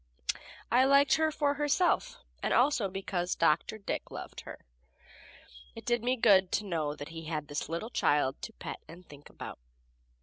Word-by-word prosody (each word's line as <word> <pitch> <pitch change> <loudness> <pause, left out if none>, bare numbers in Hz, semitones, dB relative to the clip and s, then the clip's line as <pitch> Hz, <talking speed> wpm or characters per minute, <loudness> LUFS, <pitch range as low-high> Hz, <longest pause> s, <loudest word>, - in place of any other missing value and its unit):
I 245 +2 +6
liked 280 0 +5
her 315 0 +2
for 290 -1 +1
herself, 305 - +1 0.2
and - - +1
also 250 -6 +3
because 185 -2 -2
Dr. 165 +6 +2
Dick 200 - -4
loved - - -8
her. - - -11 1.1
It - - -9
did 240 -1 +1
me 250 +1 +2
good 195 -6 +5
to 210 - +1
know 155 -6 -1
that 145 - -8
he 165 0 -8
had 155 -2 -3
this 145 +1 -4
little 170 +9 -4
child 145 -7 +1
to 225 - -6
pet - - -7
and 180 +2 -12
think 145 -1 -14
about. - - -8
195 Hz, 170 wpm, -31 LUFS, 165-260 Hz, 1.1 s, I